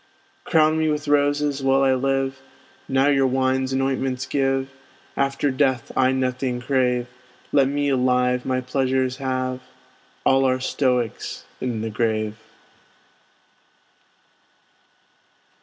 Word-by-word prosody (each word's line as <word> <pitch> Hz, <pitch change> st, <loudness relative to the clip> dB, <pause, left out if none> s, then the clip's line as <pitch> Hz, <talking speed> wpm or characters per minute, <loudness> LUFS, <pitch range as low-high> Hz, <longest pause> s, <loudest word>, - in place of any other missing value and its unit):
Crown 155 Hz, 0 st, +3 dB
me 160 Hz, 0 st, +1 dB
with 150 Hz, 0 st, -2 dB
roses 145 Hz, 0 st, +1 dB
while 135 Hz, 0 st, +3 dB
I 135 Hz, -1 st, +4 dB
live, 135 Hz, 0 st, -1 dB, 0.5 s
Now 135 Hz, +1 st, +2 dB
your 135 Hz, -2 st, +3 dB
wines 130 Hz, 0 st, 0 dB
and 135 Hz, 0 st, 0 dB
ointments 130 Hz, -1 st, -1 dB
give 135 Hz, -1 st, 0 dB, 0.4 s
After 140 Hz, +1 st, 0 dB
death 130 Hz, -3 st, 0 dB
I 130 Hz, 0 st, +3 dB
nothing 130 Hz, -1 st, -1 dB
crave; 125 Hz, -1 st, +1 dB, 0.5 s
Let 135 Hz, -2 st, +4 dB
me 145 Hz, +1 st, -1 dB
alive 125 Hz, -1 st, +2 dB
my 130 Hz, -1 st, -1 dB
pleasures 130 Hz, 0 st, 0 dB
have, 130 Hz, -1 st, -2 dB, 0.7 s
All 135 Hz, 0 st, +4 dB
are 130 Hz, 0 st, +2 dB
Stoics 125 Hz, -3 st, -1 dB
in 120 Hz, -4 st, -3 dB
the 110 Hz, 0 st, -3 dB
grave. 110 Hz, -1 st, -1 dB
130 Hz, 115 wpm, -22 LUFS, 125-135 Hz, 0.7 s, I